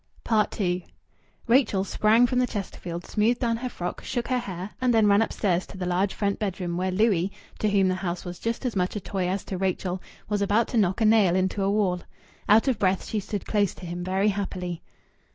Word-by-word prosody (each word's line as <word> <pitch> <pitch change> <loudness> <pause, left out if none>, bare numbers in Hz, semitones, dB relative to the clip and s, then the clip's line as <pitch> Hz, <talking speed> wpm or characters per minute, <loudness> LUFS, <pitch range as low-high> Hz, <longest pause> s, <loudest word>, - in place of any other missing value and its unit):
II 180 -3 0 0.6
Rachel 230 -5 +3
sprang 215 +4 +4
from 250 0 +1
the 250 - +2
Chesterfield, 180 -5 -5
smoothed 225 +3 +1
down 230 -2 +1
her 250 +2 -4
frock, 175 -6 -5
shook 240 -1 -3
her 255 -1 +2
hair, 190 -3 -6
and 255 -1 +3
then 225 -2 +4
ran 205 +1 +5
upstairs 190 -5 0
to - - -11
the 185 - -3
large 180 +2 0
front 200 -1 -1
bedroom, 185 -4 -2
where 185 +2 0
Louis, 195 -2 +2 0.3
to 215 - +1
whom 195 -2 +3
the 185 - +2
house 180 -2 -4
was 175 0 -6
just 230 +3 -3
as 245 - -1
much 180 +1 0
a - - -1
toy 190 -1 -2
as 190 +1 -2
to 185 - -5
Rachel, 185 -1 -1 0.3
was 205 -1 -1
about 205 +3 +2
to 240 - -1
knock 195 +1 +2
a - - +4
nail 215 -5 +5
into 190 +2 0
a 195 - +2
wall. 195 -4 +1 0.5
Out 220 +5 +6
of 255 -5 +1
breath, 190 -1 +1
she 215 - -2
stood 205 0 -5
close 205 -3 +1
to 180 - -10
him 175 +1 -5
very 190 +3 +1
happily. 185 -4 -3
200 Hz, 220 wpm, -26 LUFS, 185-220 Hz, 0.6 s, Out